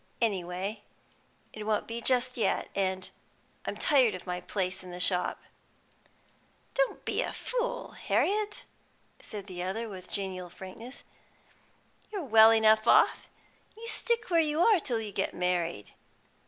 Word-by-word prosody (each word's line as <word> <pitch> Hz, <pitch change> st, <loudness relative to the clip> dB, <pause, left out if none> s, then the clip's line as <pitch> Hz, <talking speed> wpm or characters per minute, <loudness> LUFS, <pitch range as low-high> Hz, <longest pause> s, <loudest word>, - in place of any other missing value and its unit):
Any 200 Hz, -6 st, +1 dB
way 190 Hz, +4 st, -4 dB, 0.7 s
it 215 Hz, -, -6 dB
won't 215 Hz, 0 st, 0 dB
be 230 Hz, +1 st, -4 dB
just 250 Hz, +1 st, +1 dB
yet, 230 Hz, -, 0 dB
and 190 Hz, -1 st, -1 dB, 0.6 s
I'm -, -, -3 dB
tired 255 Hz, -8 st, +4 dB
of 185 Hz, -, -9 dB
my 180 Hz, -1 st, -3 dB
place 185 Hz, 0 st, -2 dB
in 180 Hz, -, -10 dB
the 180 Hz, 0 st, -7 dB
shop." 180 Hz, 0 st, +1 dB, 1.3 s
"Don't -, -, +3 dB
you -, -, -21 dB
be -, -, 0 dB
a -, -, -2 dB
fool, -, -, -3 dB
Harriet," 420 Hz, +1 st, 0 dB, 0.6 s
said 205 Hz, -2 st, -8 dB
the 180 Hz, -3 st, -6 dB
other, 205 Hz, +6 st, -3 dB
with 185 Hz, -3 st, -9 dB
genial 185 Hz, -3 st, -3 dB
frankness. 195 Hz, +9 st, -10 dB, 1.1 s
"You're 400 Hz, -5 st, -3 dB
well 220 Hz, -2 st, +8 dB
enough 220 Hz, 0 st, +5 dB
off. -, -, +5 dB, 0.5 s
You 460 Hz, +1 st, -8 dB
stick 460 Hz, -2 st, 0 dB
where 335 Hz, -, +5 dB
you 305 Hz, +1 st, +1 dB
are 425 Hz, -1 st, +6 dB
till 245 Hz, -7 st, -2 dB
you 215 Hz, -2 st, -5 dB
get -, -, -2 dB
married. 175 Hz, -, -1 dB
215 Hz, 150 wpm, -29 LUFS, 185-260 Hz, 1.3 s, well